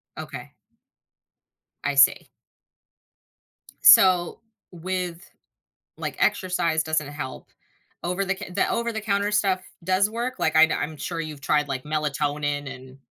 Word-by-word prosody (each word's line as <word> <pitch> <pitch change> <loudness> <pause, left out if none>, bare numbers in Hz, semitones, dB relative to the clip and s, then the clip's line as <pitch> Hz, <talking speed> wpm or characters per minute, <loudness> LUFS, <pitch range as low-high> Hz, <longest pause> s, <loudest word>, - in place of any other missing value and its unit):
Okay. - - -8 1.3
I 145 -1 -1
see. 140 0 +4 1.5
So, 180 -2 +6 0.3
with 180 0 -5 0.7
like - - -5
exercise 170 -3 +1
doesn't 155 -2 -1
help, 145 -3 -7 0.6
over 180 +3 -1
the 195 0 -1
c 210 -2 -8
the 180 - 0
over-the-counter 215 -3 -1
stuff 195 -3 +1 0.2
does 185 +3 +2
work? 235 +3 -3
Like 160 - 0
I'd 160 0 +6
I'm 155 0 -3
sure 165 +3 -4
you've 155 -3 -8
tried 150 +1 +1
like 130 -2 -4
melatonin 145 -2 -2
and 130 0 -14
165 Hz, 120 wpm, -24 LUFS, 145-190 Hz, 1.5 s, So